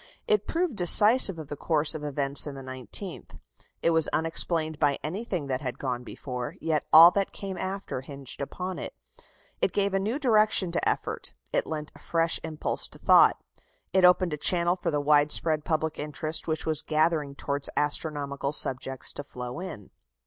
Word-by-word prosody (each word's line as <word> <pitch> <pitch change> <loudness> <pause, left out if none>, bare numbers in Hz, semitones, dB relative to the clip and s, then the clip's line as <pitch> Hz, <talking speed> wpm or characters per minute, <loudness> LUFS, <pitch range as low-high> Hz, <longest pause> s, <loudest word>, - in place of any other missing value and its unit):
It 430 -2 +1
proved 340 -5 -1
decisive 205 +2 +6
of 155 -3 -8
the 145 - -5
course 155 +1 +1
of 155 -2 -7
events 140 0 -1
in 140 - -7
the 135 - -9
nineteenth. 130 -4 -7 0.5
It 170 - +3
was 160 -2 +3
unexplained 160 -1 0
by 145 -2 +2
anything 180 -1 -4
that 130 -1 -3
had 125 -4 -5
gone 125 -2 -4
before, 125 -1 -7
yet 160 -2 -2
all 165 +2 +9
that 200 0 -1
came 195 -1 -6
after 190 -8 -5
hinged 140 0 -6
upon 180 +6 -5
it. - - -7 0.7
It - - 0
gave 200 -1 0
a 195 - +1
new 215 +7 -2
direction 215 - +3
to - - 0
effort; - - -4 0.2
it - - 0
lent 150 -1 -5
a - - -16
fresh 165 0 +1
impulse 155 -1 -3
to - - -15
thought. - - +4 0.5
It 190 - +3
opened 180 -2 +4
a - - -3
channel 175 +3 +2
for 180 - -3
the 150 -2 -1
widespread 150 +1 +3
public 160 -1 -2
interest 155 +1 -2
which 160 -1 -3
was 155 -2 -1
gathering 155 -2 0
towards 140 0 -2
astronomical 145 -1 -2
subjects 135 -1 -1
to 145 - -6
flow 125 0 -8
in." 165 - -9
155 Hz, 180 wpm, -26 LUFS, 140-180 Hz, 0.7 s, all